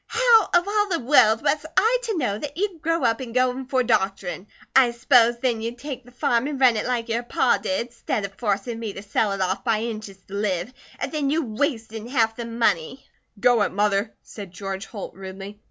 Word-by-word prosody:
"How 460 -2 +4
of 350 +2 +3
all 415 0 +1
the 340 - 0
world 235 -5 +5
was 305 - +1
I 450 +6 +4
to 440 -5 -2
know 245 -10 0
that 290 +3 -6
you'd 380 -4 -2
grow 330 -1 0
up 230 -1 +2
and 245 -3 -7
go 255 0 +3
in 260 +1 -7
for 260 -1 +1
doctorin'? 195 -4 -1 0.3
I 260 -2 +6
s'pos'd 235 0 +3
then 235 -4 +1
you'd 230 +2 -4
take 265 0 -7
the 245 - -17
farm 240 +1 0
an' 295 -2 -3
run 255 -3 +5
it 215 - -2
like 245 -2 -1
your 230 +1 -1
pa 240 - +1
did, 245 -4 -3
stead 220 -2 -2
of 195 - -8
forcin' 220 +2 -2
me 220 -3 -4
to 195 - -8
sell 205 +1 0
it 195 -1 -3
off 190 +1 -1
by 220 0 +1
inches 215 -4 -5
to 195 - -12
live, 200 +1 -2 0.2
an' - - -4
then 300 -3 -1
you 315 +3 +1
wastin' 225 -2 -3
half 225 -4 +1
the 235 - -5
money." 230 -1 -1 0.3
"Go 240 +1 +4
it, - - +1
Mother," 205 +1 0
said 200 -3 -9
George 195 +1 -6
Holt, 205 -4 -7
rudely. 195 +2 -9
235 Hz, 220 wpm, -23 LUFS, 205-265 Hz, 0.3 s, I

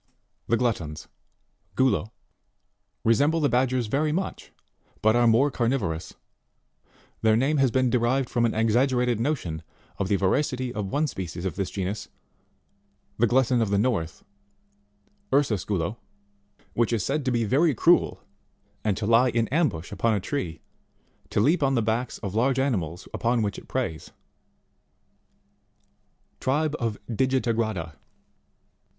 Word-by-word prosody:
The 115 - +2
Gluttons 85 - -2 0.7
Guh 130 - +3
(Plate 130 - +4
2,/#. 100 - +1
15.) 110 - -18 0.9
resemble 145 +9 +3
the 145 - +2
Bad 125 +2 +2
gers 125 -2 0
very 145 +7 0
much, 185 +5 -4 0.5
but 110 +1 +4
are 120 0 +4
more 125 +6 +4
carnivorous: 115 -11 -1 1.1
their 110 -1 +4
name 140 +5 +2
has 135 -2 +4
been 130 0 +1
derived 125 +2 +1
from 120 - 0
an 110 - -3
exaggerated 120 +1 +2
notion 115 - -2 0.4
of 100 - 0
the 100 - +2
voracity 125 +5 0
of 105 -2 -3
one 145 +10 0
species 90 - -5
of 90 - -2
this 95 -2 -2
genus, 100 +2 -4 1.1
the 120 - +4
Glutton 125 0 +3
of 110 - +1
the 100 - +2
North 100 -7 -1 1.1
Ursus 130 -9 +2
Gulo 100 +2 -2 0.8
which 120 0 +1
is 110 -5 0
said 145 +2 -1
to 130 - +1
be 120 -1 +1
very 140 +7 +2
cruel, 170 +9 +3 0.6
and 105 -4 0
to 105 - -3
lie 115 +4 +4
in 115 -1 0
ambush 135 - 0
upon 110 +2 +1
a - - 0
tree, 90 - -4 0.7
to - - 0
leap 150 +11 +3
on 135 -1 +2
the 115 - +1
backs 115 +3 -1
of 100 -2 -3
large 125 +4 +2
animals 95 - -1
upon 120 -1 +1
which 100 -1 -2
it - - -18
preys. 80 -1 -3 2.3
Tribe 150 +3 0
of 115 -4 -2
Digiligrada. 115 - 0
115 Hz, 145 wpm, -26 LUFS, 105-130 Hz, 2.3 s, Plate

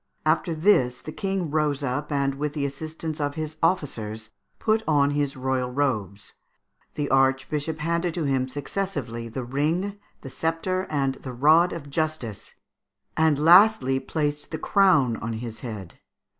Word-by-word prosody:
After 160 +1 +1
this 145 -8 +3
the 155 - -8
King 190 -3 -2
rose 150 -2 0
up, 140 +3 -2
and 140 -1 +1
with 145 +1 -3
the 145 -2 -1
assistance 155 +2 -5
of 145 0 -1
his 155 0 -4
officers, 110 - -1 0.3
put 220 0 +1
on 145 -2 +3
his 145 -2 -1
royal 130 -1 -1
robes. 110 -8 -2 0.6
The 145 -1 -1
Archbishop 135 +4 +1
handed 170 +2 -1
to 170 - -1
him 135 -2 +1
successively 135 - -4
the 125 +3 -5
ring, 165 +10 -1 0.2
the 135 - -8
sceptre, 165 +6 -1
and 140 -3 0
the 130 - -6
rod 155 +8 +5
of 145 -4 -7
justice, 155 -9 -3 0.6
and 160 -2 +3
lastly 165 -4 +6
placed 150 0 -2
the 160 - -4
crown 150 - +3
on 115 +1 -4
his 115 0 -6
head. 105 -8 -8
145 Hz, 150 wpm, -25 LUFS, 130-160 Hz, 0.6 s, lastly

